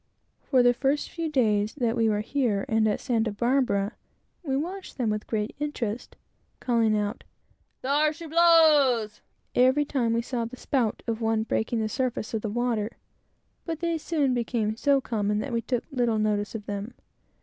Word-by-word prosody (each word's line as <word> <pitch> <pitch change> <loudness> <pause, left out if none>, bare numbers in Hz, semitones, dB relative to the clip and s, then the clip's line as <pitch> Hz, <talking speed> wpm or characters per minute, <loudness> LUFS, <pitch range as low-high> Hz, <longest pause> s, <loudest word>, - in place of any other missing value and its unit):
For 255 -3 +3
the 245 0 +5
first 275 +4 -1
few 330 -1 -3
days 215 -6 +1
that 240 -4 0
we 225 -2 +2
were 210 -1 +1
here 225 -4 0
and 220 -1 +2
at 210 - 0
Santa 230 -4 0
Barbara, 235 -2 +1 0.5
we 270 -6 -1
watched 365 +6 -5
them 235 -5 0
with 210 0 -3
great 215 -1 -2
interest 250 -7 -4 0.4
calling 230 -3 +2
out 210 +3 -3 0.6
"there 295 +3 +2
she 330 +2 -9
blows!" 300 -10 +4 0.3
every 260 +4 +4
time 245 -6 0
we 230 0 0
saw 240 -1 -2
the 245 +3 -8
spout 245 -6 -1
of 230 -1 -3
one 225 -1 +1
breaking 225 +1 -1
the 215 - 0
surface 240 0 -2
of 220 - -1
the 215 - -3
water; 235 -1 -1 0.7
but 325 -2 -4
they 335 -1 -1
soon 295 -5 0
became 230 -3 -1
so 275 +3 +2
common 210 -4 -1
that 245 +4 -3
we 230 - +1
took 240 +1 -2
little 240 -4 +1
notice 210 0 0
of 210 -2 -6
them. 205 +3 -5
235 Hz, 175 wpm, -26 LUFS, 215-275 Hz, 0.7 s, the